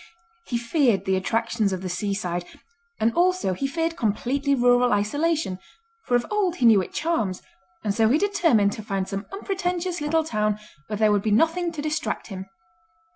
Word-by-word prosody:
He 240 - -1
feared 235 - +1
the 190 - +2
attractions 225 +2 0
of 185 0 -4
the - - -3
seaside, 180 -1 -2 0.6
and 225 +1 +2
also 365 - +2
he 275 +9 -2
feared 330 +4 -1
completely 270 +5 0
rural 245 0 +4
isolation, 285 - 0 0.5
for 245 - +1
of 240 -1 +2
old 400 -5 +1
he 250 - 0
knew 220 -4 +7
it - - -7
charms, 225 - -1 0.4
and 205 - 0
so 220 +1 +3
he 275 - +4
determined 325 - +3
to 215 - -6
find 195 -2 -2
some 195 +1 -5
unpretentious 360 -3 -2
little 320 +2 +1
town 215 -7 0 0.3
where 210 - -3
there 215 0 +3
would 205 -1 +2
be 215 - -1
nothing 330 +10 +2
to 295 -2 -5
distract 305 -9 -2
him. 190 -1 -7
235 Hz, 180 wpm, -24 LUFS, 205-325 Hz, 0.6 s, knew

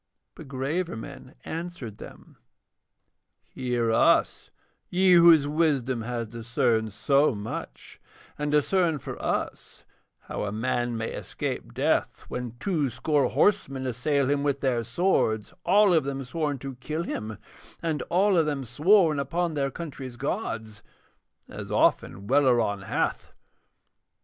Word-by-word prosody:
But 160 - -12
graver 145 +7 -2
men 110 - -10
answered 165 -10 -6
them: - - -13 1.1
'Hear 120 -3 -1
us, 115 - +3 0.4
ye 185 +1 +4
whose 170 -4 +7
wisdom 140 -6 +1
has 115 0 -3
discerned 115 -1 0
so 140 +5 +2
much, 100 - -7 0.3
and 150 0 -2
discern 160 +2 +2
for - - -8
us - - -3 0.4
how - - -5
a 100 - -3
man 120 +2 -1
may 110 0 -3
escape - - -5
death - - 0
when 125 -2 -5
two 155 -7 0
score 140 +2 +1
horsemen 135 -10 +1
assail 130 +3 0
him 140 0 +1
with 140 -1 -1
their 125 -4 +1
swords, 115 - 0
all 200 +1 +5
of 160 -3 +4
them 135 0 -4
sworn 145 +2 -2
to 135 0 -7
kill 155 +6 -3
him, 110 -8 -5 0.4
and 160 -3 -2
all 190 +3 +3
of 160 -2 +3
them 145 -3 -2
sworn 155 - +3
upon 170 +4 -1
their 140 -2 0
country's 135 -5 -7
gods; 115 - -4 0.7
as - - -8
often 95 - +1
Welleran 120 -7 +2
hath. - - -2
135 Hz, 130 wpm, -26 LUFS, 120-160 Hz, 1.1 s, whose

